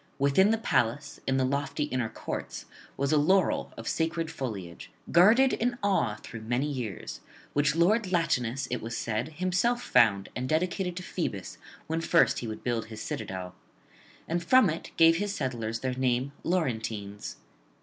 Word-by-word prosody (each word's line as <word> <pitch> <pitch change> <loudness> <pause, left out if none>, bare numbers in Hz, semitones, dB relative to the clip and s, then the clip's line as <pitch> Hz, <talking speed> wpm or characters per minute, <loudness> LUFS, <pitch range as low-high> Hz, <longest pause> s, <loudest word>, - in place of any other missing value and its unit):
Within 140 +9 +4
the 225 - +3
palace, 140 - 0
in 135 0 +2
the 130 - +2
lofty 140 +2 -1
inner 130 -5 -1
courts, - - -6 0.3
was 140 +1 0
a 155 - +4
laurel 185 +6 +2
of - - -7
sacred 165 0 -1
foliage, 100 - -6 0.2
guarded 225 +10 +6
in 240 +1 0
awe 190 - +2
through 115 -2 -8
many 120 +5 0
years, 125 - -5 0.3
which 145 +1 +2
lord 185 +4 +3
Latinus, 135 -7 0
it 125 - -2
was 115 +1 -4
said, 115 +7 -2
himself 185 +8 0
found 100 -4 +3
and 130 +1 -3
dedicated 180 +3 0
to 180 - -5
Phoebus 95 - -4 0.3
when 160 +1 -2
first 170 +1 +3
he 120 - -5
would 110 - -6
build 120 -3 -1
his 110 -1 -8
citadel; 95 -4 -5 0.7
and 170 +1 -1
from 255 -1 +5
it 165 - -6
gave 165 0 +6
his 205 +2 -2
settlers 115 - -3
their 130 -1 -1
name, 130 +1 0
Laurentines. 110 - -2
140 Hz, 160 wpm, -28 LUFS, 115-175 Hz, 0.7 s, guarded